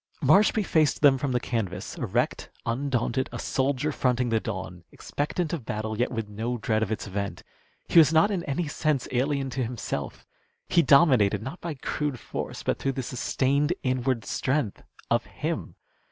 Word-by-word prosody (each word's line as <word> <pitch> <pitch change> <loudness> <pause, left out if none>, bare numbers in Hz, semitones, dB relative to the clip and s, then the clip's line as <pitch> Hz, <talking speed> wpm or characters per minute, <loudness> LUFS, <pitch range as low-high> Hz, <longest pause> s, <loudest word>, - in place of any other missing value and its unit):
Marshby 200 +8 +5
faced 155 -4 +2
them 135 -2 +6
from 140 0 -1
the 125 - +2
canvas, 105 -8 -3
erect, - - -1 0.2
undaunted, 130 +1 -1
a - - -5
soldier 135 +2 0
fronting 125 -3 +1
the 115 -1 +2
dawn, 95 -5 -6
expectant 155 +3 -3
of 160 -7 -3
battle, 110 0 -3
yet 120 +3 0
with 115 -3 -3
no 115 +4 -3
dread 110 0 0
of 110 -1 -1
its 110 - -2
event. 100 0 -4 0.4
He - - +6
was 155 -1 +6
not 165 +6 +4
in 185 -4 -1
any 160 +3 -1
sense 145 -2 0
alien 135 +1 0
to 130 0 -1
himself. 110 - -4 0.4
He 170 - +4
dominated, 130 - +5
not 135 +9 -7
by 170 -3 -4
crude 145 -1 -3
force, - - -5
but - - -1
through 135 - -1
the 130 - -3
sustained 140 +5 0
inward 130 -3 0
strength 130 -6 -1 0.3
of - - +2
him. - - -4
130 Hz, 170 wpm, -26 LUFS, 115-145 Hz, 0.4 s, them